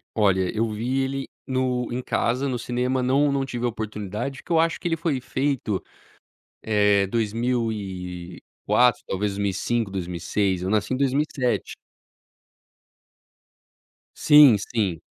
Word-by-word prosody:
Olha, 95 Hz, -4 st, +2 dB
eu 115 Hz, +2 st, +1 dB
vi 125 Hz, +5 st, -1 dB
ele 135 Hz, 0 st, -3 dB, 0.2 s
no 130 Hz, -2 st, 0 dB
em 125 Hz, +1 st, -2 dB
casa, 125 Hz, +2 st, 0 dB
no 130 Hz, -2 st, -1 dB
cinema 125 Hz, +2 st, -1 dB
não 140 Hz, +3 st, +3 dB
não 135 Hz, -1 st, 0 dB
tive 120 Hz, -2 st, -4 dB
a -, -, +2 dB
oportunidade, 110 Hz, +3 st, -5 dB
que -, -, -11 dB
eu 165 Hz, -, +4 dB
acho 165 Hz, 0 st, +1 dB
que -, -, -3 dB
ele 165 Hz, -, 0 dB
foi 155 Hz, -6 st, -1 dB
feito, 130 Hz, -8 st, -1 dB, 0.8 s
eh, 105 Hz, -2 st, +3 dB
2004, 105 Hz, -2 st, -1 dB
talvez 100 Hz, +2 st, -1 dB
2005, 100 Hz, +2 st, -1 dB
2006, 90 Hz, +1 st, -1 dB
eu 95 Hz, -, -2 dB
nasci 105 Hz, +3 st, 0 dB
em -, -, 0 dB
2007. 135 Hz, -1 st, 0 dB, 2.4 s
Sim, 150 Hz, -6 st, +7 dB
sim, 100 Hz, -5 st, -2 dB
115 Hz, 125 wpm, -24 LUFS, 100-130 Hz, 2.4 s, Sim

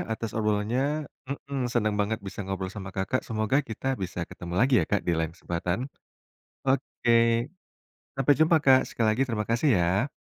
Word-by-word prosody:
atas 110 Hz, 0 st, -4 dB
obrolannya 120 Hz, +8 st, 0 dB, 0.2 s
heeh, 140 Hz, 0 st, -4 dB
seneng 110 Hz, -4 st, +1 dB
banget 110 Hz, +2 st, 0 dB
bisa 95 Hz, +1 st, -5 dB
ngobrol 95 Hz, -1 st, -3 dB
sama 100 Hz, -3 st, -7 dB
Kakak, 95 Hz, +7 st, 0 dB
semoga 110 Hz, +2 st, 0 dB
kita 110 Hz, +3 st, -6 dB, 0.2 s
bisa 90 Hz, -1 st, -4 dB
ketemu 85 Hz, 0 st, -7 dB
lagi 130 Hz, +2 st, +4 dB
ya -, -, +1 dB
Kak 105 Hz, -, +2 dB
di 85 Hz, -, +2 dB
lain 80 Hz, 0 st, -1 dB
kesempatan. 90 Hz, +2 st, -2 dB, 0.9 s
Oke, 115 Hz, -3 st, +2 dB, 0.7 s
sampai 135 Hz, +1 st, +4 dB
jumpa 160 Hz, +1 st, +5 dB
Kak, 130 Hz, -1 st, +7 dB
sekali 115 Hz, -, 0 dB
lagi 120 Hz, +5 st, +1 dB
terima 105 Hz, -2 st, -2 dB
kasih 120 Hz, +6 st, +2 dB
ya. 95 Hz, +9 st, +1 dB
110 Hz, 165 wpm, -27 LUFS, 95-130 Hz, 0.9 s, Kak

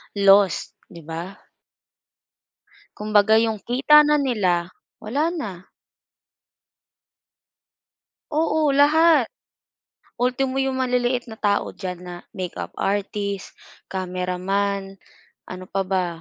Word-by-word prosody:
Loss, 200 Hz, -1 st, +4 dB, 0.2 s
'di 170 Hz, -3 st, -12 dB
ba? 165 Hz, +4 st, -6 dB, 1.6 s
Kumbaga 210 Hz, 0 st, +3 dB
yung 225 Hz, -1 st, 0 dB
kita 275 Hz, +7 st, +5 dB
na 300 Hz, -1 st, +3 dB
nila, 185 Hz, -9 st, 0 dB, 0.3 s
wala 290 Hz, +10 st, -1 dB
na. 195 Hz, -, -6 dB, 2.7 s
Oo, 310 Hz, -1 st, +1 dB
lahat. 295 Hz, -1 st, +5 dB, 0.9 s
Ultimo 260 Hz, +2 st, 0 dB
yung 265 Hz, -1 st, -1 dB
maliliit 250 Hz, -1 st, 0 dB
na 220 Hz, -, -9 dB
tao 205 Hz, -1 st, 0 dB
diyan 180 Hz, -3 st, -6 dB
na 180 Hz, -1 st, -7 dB, 0.2 s
makeup 185 Hz, -2 st, -5 dB
artist, 200 Hz, 0 st, -2 dB, 0.4 s
cameraman, 190 Hz, +2 st, -2 dB, 0.5 s
ano 185 Hz, 0 st, -8 dB
pa 195 Hz, 0 st, -1 dB
ba? 185 Hz, -1 st, 0 dB
205 Hz, 95 wpm, -22 LUFS, 190-260 Hz, 2.7 s, kita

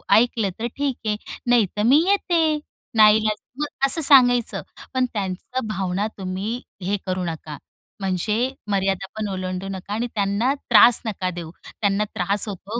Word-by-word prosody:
ऐकलं 225 Hz, -3 st, +2 dB
तर 235 Hz, -, -2 dB
ठीक 280 Hz, -3 st, -1 dB
आहे, 210 Hz, -, +1 dB, 0.3 s
नाही 240 Hz, -4 st, +4 dB
तर 210 Hz, -, 0 dB
मी 275 Hz, +7 st, +5 dB
येते 330 Hz, -6 st, +1 dB, 0.4 s
नाईलाज 215 Hz, 0 st, +5 dB, 0.2 s
मग 295 Hz, -, -1 dB, 0.2 s
असं 320 Hz, +4 st, +7 dB
सांगायचं. 245 Hz, -4 st, +5 dB, 0.3 s
पण 255 Hz, -1 st, +1 dB
त्यांचा 200 Hz, +6 st, -4 dB
भावना 195 Hz, 0 st, -2 dB
तुम्ही 195 Hz, +6 st, -4 dB, 0.2 s
हे 200 Hz, +3 st, -1 dB
करू 185 Hz, -1 st, -2 dB
नका, 155 Hz, -3 st, -6 dB, 0.4 s
म्हणजे 210 Hz, +6 st, -1 dB, 0.2 s
मर्यादा 195 Hz, -1 st, 0 dB
पण 215 Hz, -1 st, -2 dB
ओलांडू 185 Hz, 0 st, -4 dB
नका 195 Hz, +2 st, -6 dB
आणि 235 Hz, +3 st, -2 dB
त्यांना 205 Hz, +6 st, +1 dB, 0.2 s
त्रास 240 Hz, -1 st, +7 dB
नका 190 Hz, -4 st, -2 dB
देऊ. 170 Hz, -2 st, -7 dB, 0.3 s
त्यांना 200 Hz, 0 st, +1 dB
त्रास 200 Hz, +4 st, 0 dB
होतो 205 Hz, +4 st, -6 dB
210 Hz, 150 wpm, -22 LUFS, 190-245 Hz, 0.4 s, असं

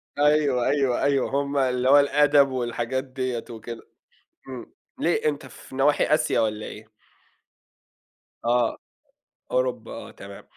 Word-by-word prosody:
أيوه، 145 Hz, -4 st, +2 dB
أيوه، 135 Hz, -4 st, +1 dB
أيوه. 140 Hz, -1 st, +2 dB
هم 140 Hz, +1 st, -1 dB
اللي 130 Hz, -1 st, +1 dB
هو 145 Hz, +1 st, +8 dB
الأدب 145 Hz, 0 st, +4 dB
والحاجات 125 Hz, 0 st, -2 dB
ديّة 130 Hz, -3 st, -4 dB
وكده، 115 Hz, 0 st, -8 dB, 0.7 s
إمم. 130 Hz, -3 st, -9 dB, 0.3 s
ليه 170 Hz, -, 0 dB
أنت 145 Hz, -2 st, -3 dB
في 130 Hz, -, -14 dB
نواحي 145 Hz, +2 st, +3 dB
آسيا 155 Hz, -, +1 dB
والّا 110 Hz, -1 st, -1 dB
إيه؟ 110 Hz, +1 st, -11 dB, 1.6 s
آه، 120 Hz, 0 st, +2 dB, 0.7 s
أوروبا، -, -, -1 dB
آه -, -, -8 dB
تمام. -, -, -11 dB
130 Hz, 125 wpm, -24 LUFS, 120-145 Hz, 1.6 s, هو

